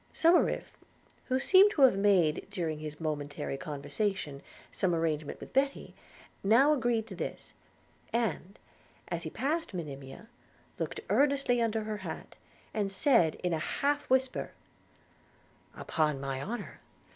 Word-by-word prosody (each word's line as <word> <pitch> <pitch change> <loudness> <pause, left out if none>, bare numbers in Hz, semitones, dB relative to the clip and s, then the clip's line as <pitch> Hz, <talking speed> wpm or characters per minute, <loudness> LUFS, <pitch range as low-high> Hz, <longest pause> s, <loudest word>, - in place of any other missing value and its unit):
Somerive, 335 +2 +3 0.5
who 260 - +1
seemed 380 +9 +6
to 285 - +3
have 260 -7 +7
made, 190 -6 +3
during 165 -6 -3
his 150 -1 -7
momentary 145 -3 -3
conversation, 145 +2 -3 0.3
some 180 -3 +1
arrangement 155 -2 -1
with - - -11
Betty, 275 +1 0 0.5
now 245 +9 +5
agreed 240 -5 +1
to 205 -4 -9
this; - - -6 0.6
and, 210 -4 -2 0.5
as - - -2
he - - -5
passed 310 - -2
Monimia, 140 +3 -7 0.5
looked - - -3
earnestly 275 -4 +3
under 220 -1 0
her 215 0 -3
hat, 185 -5 -7 0.4
and 205 -2 -1
said 195 - +4
in 180 -1 +1
a 160 - 0
half 285 - -1
whisper, 260 0 +1 1.2
'Upon 150 -3 0
my 135 -1 -3
honour! 235 +10 -6
195 Hz, 130 wpm, -30 LUFS, 155-255 Hz, 1.2 s, have